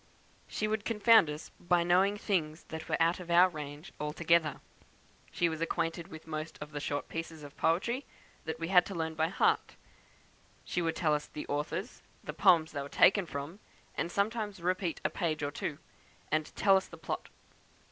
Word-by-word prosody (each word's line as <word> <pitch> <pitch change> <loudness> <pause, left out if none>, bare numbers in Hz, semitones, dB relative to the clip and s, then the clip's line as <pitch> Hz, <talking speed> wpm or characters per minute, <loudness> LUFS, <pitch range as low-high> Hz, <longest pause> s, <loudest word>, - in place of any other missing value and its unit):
"She 215 - -2
would 215 -1 -1
confound 220 -3 +5
us 150 +1 -7
by 175 0 +2
knowing 190 +4 +3
things 165 -6 -1
that 160 0 -7
were - - +1
out 170 +2 +3
of 180 -1 -9
our 175 +2 +7
range 150 -1 -8
altogether. 160 +1 +1 0.7
She 175 - +2
was 160 -1 -4
acquainted 165 0 -1
with 160 -4 -11
most 155 0 -5
of 150 0 -8
the 145 - -4
short 145 0 -3
pieces 165 -1 -6
of 145 -1 -11
poetry 235 - 0 0.4
that 160 0 -4
we 165 +1 -3
had 180 -2 +7
to 195 - -6
learn 160 -1 -2
by 160 0 +1
heart; 180 - +1 1.0
would 165 -2 +1
tell 155 -3 +2
us 150 0 -1
the 150 - -7
authors, 150 - -3 0.2
the - - -5
poems 160 -3 +4
they 145 - -3
were 140 - -7
taken 195 +3 +5
from, 145 +6 -6 0.3
and 170 - -2
sometimes 205 0 -1
repeat 180 0 -1
a - - +3
page 155 -5 -1
or 145 - -1
two, 145 0 -4 0.5
and 155 0 +1
tell 195 -1 +5
us 190 - +1
the 170 - -12
plot. 160 - -5
165 Hz, 185 wpm, -31 LUFS, 155-185 Hz, 1.0 s, our